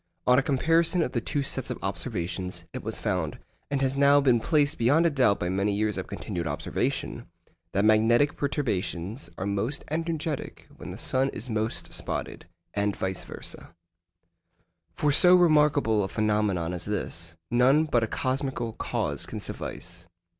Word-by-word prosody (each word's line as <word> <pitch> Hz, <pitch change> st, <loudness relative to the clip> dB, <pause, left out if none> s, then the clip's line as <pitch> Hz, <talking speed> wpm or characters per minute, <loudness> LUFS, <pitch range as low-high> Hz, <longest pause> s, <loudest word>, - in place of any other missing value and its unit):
On 125 Hz, +1 st, +5 dB
a -, -, +2 dB
comparison 165 Hz, +5 st, +2 dB
of 125 Hz, -, -3 dB
the 120 Hz, -, -1 dB
two 140 Hz, +5 st, -1 dB
sets 130 Hz, -1 st, -2 dB
of -, -, -3 dB
observations, 95 Hz, -3 st, -3 dB
it -, -, -5 dB
was -, -, -4 dB
found -, -, -2 dB, 0.3 s
(and 140 Hz, -1 st, 0 dB
has 135 Hz, 0 st, +1 dB
now 140 Hz, +1 st, +5 dB
been 130 Hz, -4 st, +4 dB
placed 150 Hz, +3 st, +1 dB
beyond 145 Hz, +9 st, +4 dB
a 170 Hz, -, +3 dB
doubt 125 Hz, -8 st, +3 dB
by 90 Hz, -, -1 dB
many 100 Hz, +3 st, 0 dB
years 105 Hz, 0 st, 0 dB
of 95 Hz, -, -4 dB
continued 90 Hz, -6 st, -4 dB
observation) 70 Hz, -, -2 dB, 0.5 s
that 100 Hz, +2 st, +2 dB
magnetic 115 Hz, +6 st, +4 dB
perturbations 100 Hz, -, -2 dB
are 95 Hz, -, -3 dB
most 100 Hz, +8 st, -1 dB
energetic 160 Hz, -2 st, -3 dB
when -, -, -9 dB
the -, -, -7 dB
sun 130 Hz, +1 st, +1 dB
is 120 Hz, 0 st, -6 dB
most 110 Hz, +1 st, -1 dB
spotted, -, -, -4 dB, 0.3 s
and 100 Hz, 0 st, 0 dB
vice 95 Hz, -1 st, -3 dB
versâ. 85 Hz, -, -6 dB, 1.2 s
For 150 Hz, -, +2 dB
so 180 Hz, +5 st, +7 dB
remarkable 150 Hz, -, +4 dB
a -, -, -1 dB
phenomenon 105 Hz, -5 st, 0 dB
as 90 Hz, -1 st, -4 dB
this, 85 Hz, -5 st, -4 dB, 0.2 s
none 130 Hz, +6 st, +5 dB
but 125 Hz, -6 st, +2 dB
a 110 Hz, -, 0 dB
cosmical 130 Hz, -2 st, -2 dB
cause -, -, -2 dB
can -, -, -5 dB
suffice. 85 Hz, 0 st, -6 dB
120 Hz, 160 wpm, -27 LUFS, 100-140 Hz, 1.2 s, so